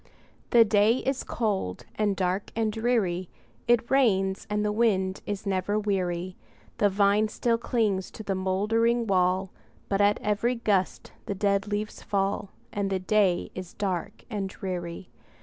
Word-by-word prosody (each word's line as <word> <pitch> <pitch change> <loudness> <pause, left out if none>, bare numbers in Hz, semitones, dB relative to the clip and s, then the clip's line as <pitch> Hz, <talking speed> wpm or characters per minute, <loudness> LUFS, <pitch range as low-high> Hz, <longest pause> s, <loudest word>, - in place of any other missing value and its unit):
The 235 -1 +7
day 210 +1 +4
is 270 0 0
cold, 200 - -2
and 210 -2 0
dark, 185 +1 -1
and 220 -1 0
dreary; 210 -7 0 0.4
It 235 -1 +2
rains, 195 -8 +2
and 210 0 0
the 210 - +1
wind 195 -4 +1
is 205 -1 -4
never 195 +1 0
weary; 185 -3 -1 0.4
The 205 - +4
vine 200 +2 +3
still 230 +1 0
clings 210 -6 0
to 220 - -8
the 200 - -1
moldering 220 +5 +1
wall, 185 -1 +1 0.4
But 200 0 +1
at 205 +1 +3
every 220 +4 +1
gust 205 -5 0 0.2
the 200 - -2
dead 200 0 +1
leaves 210 +1 -3
fall, 200 0 -1 0.2
And 200 -1 -1
the 190 - 0
day 185 -1 +1
is 185 -1 -8
dark 190 -4 -3
and 205 -5 -3
dreary. 180 -2 -6
200 Hz, 150 wpm, -27 LUFS, 190-215 Hz, 0.4 s, The